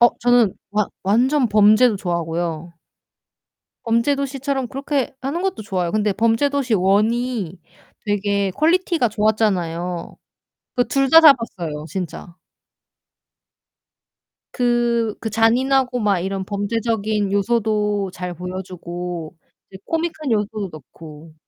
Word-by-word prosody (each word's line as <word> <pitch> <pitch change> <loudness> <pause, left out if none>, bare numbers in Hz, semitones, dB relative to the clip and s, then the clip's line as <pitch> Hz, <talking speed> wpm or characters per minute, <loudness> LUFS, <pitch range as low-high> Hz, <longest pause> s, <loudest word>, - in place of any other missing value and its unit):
어 240 - +8
저는 245 -5 +3 0.2
완 210 -1 +1 0.2
완전 250 +6 +2
범죄도 215 +2 +5
좋아하고요. 170 -2 -3 1.1
범죄도시처럼 270 +2 0
그렇게 275 0 -2
하는 285 +7 -3
것도 380 - -2
좋아요. 185 -5 -2
근데 210 -1 +1
범죄도시 240 +4 +1
1 200 +3 +3
이 235 -8 -3 0.5
되게 200 -1 0
퀄리티가 330 - +2
좋았잖아요. 185 -6 -1 0.6
그 245 -2 +1
둘 275 -1 +1
다 325 - +9
잡았어요. 185 - +3
진짜. 180 -2 -6 2.2
그 240 -3 +1
그 220 - -4
잔인하고 250 +3 +2
막 200 -4 +1
이런 190 +1 -3
범죄적인 210 0 -1
요소도 210 -2 0
잘 180 -1 -6
보여주고 180 -2 -6 0.4
이제 190 - -11
코믹한 320 -4 -2
요소도 210 -1 -1
넣고. 155 +2 -13
215 Hz, 245 characters per minute, -20 LUFS, 185-245 Hz, 2.2 s, 다